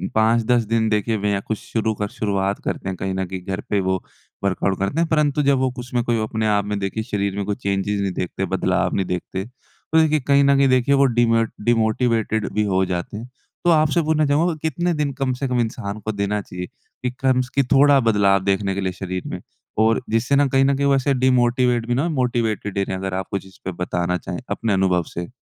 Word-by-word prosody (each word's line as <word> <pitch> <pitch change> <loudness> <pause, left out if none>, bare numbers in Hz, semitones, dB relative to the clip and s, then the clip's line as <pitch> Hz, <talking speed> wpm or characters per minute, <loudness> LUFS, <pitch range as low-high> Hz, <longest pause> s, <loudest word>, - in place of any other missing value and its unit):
5-10 115 +2 +3
दिन 110 +1 +1
देखे 110 +1 0
बिना 100 -1 0
कुछ 110 - -1
शुरू 110 -1 -2
कर 105 -1 -3
शुरुआत 100 -2 -1
करते - - -3
हैं, 95 - -3
कहीं 95 +1 -3
न 95 0 -1
कहीं 95 0 -6
घर 95 +1 -3
पे 105 - +2
वो 95 -1 0 0.4
वर्कआउट 95 0 0
करते 100 +11 -1
हैं। 170 - +1
परंतु 150 -2 +2
जब 140 -1 +3
वो 130 0 +2
उसमें 125 -1 -2
कोई 120 -1 0
अपने 110 0 -1
आप 100 -1 +2
में 105 0 -2
देखिए 100 +3 -3
शरीर 100 -3 -2
में 100 - -2
कोई 105 - -1
चेंजेस 100 +1 -1
नहीं 100 -1 -1
देखते, 90 -1 -3
बदलाव - - 0
नहीं 95 - 0
देखते, 90 +1 -4
तो 135 +5 -3
देखिए 155 -1 +3
कहीं 140 0 +5
न 140 0 +4
कहीं 135 0 +4
देखिए 130 +2 +3
वो 140 0 +4
डिमोट 115 -2 +2
डिमोटिवेटेड 110 -2 +1
भी 105 - +1
हो 95 -2 +1
जाते 90 +2 -4
हैं। 115 +3 -7 0.4
तो - - +5
आपसे 155 +1 +3
पूछना 155 -1 +1
चाहूँगा 155 +5 +2
कितने 170 +3 0
दिन 150 -3 -1
कम 135 -1 -1
से 135 +2 -3
कम 125 -1 0
इंसान 110 -3 -4
को 110 +1 -3
देना 105 0 -1
चाहिए 90 -2 -7 0.4
कि 125 - 0
कम्स 130 -1 +1
कि 140 - +4
थोड़ा 140 0 +6
बदलाव 100 -5 +3
देखने 95 0 0
के 100 - -2
लिए 95 -1 -1
शरीर 95 -1 -5
में, - - -5 0.4
और 110 +1 +3
जिससे 115 +5 +1
ना 145 0 +4
कहीं 135 0 +3
न 140 0 +3
कहीं 140 0 +1
वैसे 140 0 +2
डिमोटिवेट 125 -2 +2
भी 120 - +1
ना 140 +7 +1
मोटिवेटेड 120 - -1
ही 100 - +2
रहें। 95 - -3
अगर 95 0 -4
आप 95 0 -3
कुछ 100 -1 -3
इसपे 95 0 -8
बताना 90 0 -1
चाहें 90 0 -6
अपने 115 -3 -1
अनुभव 95 -2 +2
से। 85 0 -4
110 Hz, 225 wpm, -21 LUFS, 100-130 Hz, 0.4 s, थोड़ा